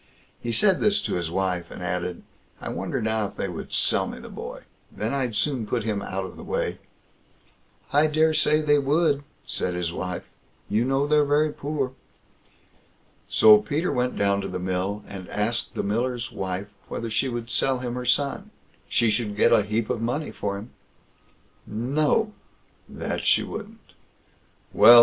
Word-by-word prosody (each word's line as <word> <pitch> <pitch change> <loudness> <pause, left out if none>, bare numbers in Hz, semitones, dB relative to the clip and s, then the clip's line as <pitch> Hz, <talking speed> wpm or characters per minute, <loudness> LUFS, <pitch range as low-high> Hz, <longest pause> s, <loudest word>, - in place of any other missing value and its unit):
He 120 - -2
said 190 - +4
this 210 0 +3
to - - -2
his 85 -2 -1
wife, 90 -1 -1
and - - -8
added: 90 0 -3 0.4
"I - - -5
wonder - - -3
now 110 -1 0
if 100 - -13
they - - -2
would 90 -3 -7
sell - - +2
me - - -6
the - - -10
boy; - - -7 0.3
then 110 +4 -3
I'd 130 -5 -1
soon 130 -3 0
put 115 0 -1
him 105 -2 -1
out 95 0 -3
of 95 - -10
the - - -9
way?" - - -2 1.1
"I 150 +2 +5
daresay 155 0 +3
they 145 -1 +4
would", 145 +1 +2 0.2
said 90 - -1
his 85 -1 -2
wife; 90 -1 -4 0.4
"you 110 +4 +1
know 135 +2 +2
they're 150 0 +4
very 145 +1 +2
poor." 140 -3 -2 1.4
So 105 -1 +8
Peter 145 +12 -1
went 125 -1 0
down 100 0 +2
to 95 - -4
the 90 - -4
mill, 95 +3 -2
and 95 -2 -8
asked 105 +3 -1
the - - -1
miller's 120 +4 -1
wife 95 +1 -4 0.2
whether 115 -1 -4
she 130 +4 +1
would 120 -1 -4
sell 135 -1 +2
him 125 -1 -4
her 125 0 -3
son; 140 +3 +1 0.4
she 115 -2 +3
should 105 -3 -1
get - - +4
a - - +6
heap 105 +2 -1
of 115 - -2
money 125 +7 -1
for 100 -1 -3
him? 105 +5 -9 1.0
"No!" 145 - +1 0.6
that - - -4
she - - +4
wouldn't. 220 +1 -9 0.8
"Well!" 120 0 +10
115 Hz, 175 wpm, -25 LUFS, 100-145 Hz, 1.4 s, Well